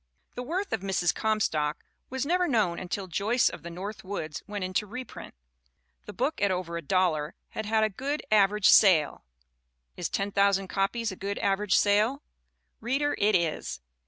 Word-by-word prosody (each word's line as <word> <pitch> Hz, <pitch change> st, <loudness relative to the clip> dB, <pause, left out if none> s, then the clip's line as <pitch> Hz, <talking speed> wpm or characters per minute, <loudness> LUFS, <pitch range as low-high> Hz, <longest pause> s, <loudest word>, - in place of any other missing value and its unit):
The 245 Hz, -, -5 dB
worth 360 Hz, +10 st, -3 dB
of 220 Hz, -, -1 dB
Mrs. 185 Hz, -4 st, +1 dB
Comstock 165 Hz, -9 st, -1 dB, 0.2 s
was 265 Hz, +1 st, -2 dB
never 360 Hz, +3 st, +2 dB
known 210 Hz, -, +1 dB
until 190 Hz, +2 st, -4 dB
Joyce 205 Hz, +8 st, +1 dB
of -, -, -9 dB
the 170 Hz, -, -8 dB
North 195 Hz, +5 st, -7 dB
Woods 160 Hz, -6 st, -5 dB
went 205 Hz, -2 st, -4 dB
into 185 Hz, +3 st, -1 dB
reprint. 250 Hz, -, -8 dB, 0.7 s
The -, -, -5 dB
book, 300 Hz, -4 st, -2 dB
at 200 Hz, -, +3 dB
over 180 Hz, -2 st, -2 dB
a 170 Hz, -, -3 dB
dollar, 165 Hz, -3 st, 0 dB
had 220 Hz, -, -5 dB
had 220 Hz, 0 st, +2 dB
a 215 Hz, -, +2 dB
"good, 280 Hz, +8 st, -3 dB
aver 210 Hz, -1 st, +4 dB
age 210 Hz, -, +3 dB
sale" 165 Hz, -8 st, +5 dB, 0.7 s
is -, -, -3 dB
10,000 200 Hz, -1 st, +1 dB
copies 215 Hz, +4 st, -1 dB
a -, -, -7 dB
good 200 Hz, +2 st, -4 dB
average 200 Hz, 0 st, +1 dB
sale? 215 Hz, +8 st, +2 dB, 0.6 s
Reader, 275 Hz, +5 st, 0 dB
it 205 Hz, 0 st, +3 dB
is. 165 Hz, -, -1 dB
200 Hz, 170 wpm, -28 LUFS, 185-225 Hz, 0.7 s, sale